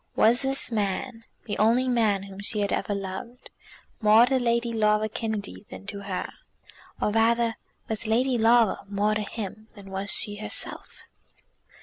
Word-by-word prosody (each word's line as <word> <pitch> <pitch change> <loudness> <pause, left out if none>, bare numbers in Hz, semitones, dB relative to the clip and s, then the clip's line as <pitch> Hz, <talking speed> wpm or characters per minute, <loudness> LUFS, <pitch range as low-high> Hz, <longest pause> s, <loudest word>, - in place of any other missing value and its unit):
Was 235 +3 +5
this 270 -1 +2
man, 225 +3 -2 0.2
the 210 - -4
only 235 +4 +3
man 220 -6 +2
whom 195 0 -10
she 210 +1 -1
had 200 - 0
ever 205 - -1
loved, 200 +6 -7 0.5
more 215 +2 +7
to 265 +1 +1
Lady 235 -1 0
Laura 215 -1 +2
Kennedy 215 - -5
than 95 +1 -10
to 200 - -6
her; 195 -2 -4 0.7
or - - 0
rather, 230 +1 +2 0.3
was 220 0 -4
Lady 250 +4 +2
Laura 230 -2 +4
more 205 +1 +1
to 215 - -1
him 215 0 -6
than 195 -2 -12
was 195 +1 -3
she 205 0 0
herself? 215 - -3
215 Hz, 155 wpm, -26 LUFS, 200-235 Hz, 0.7 s, more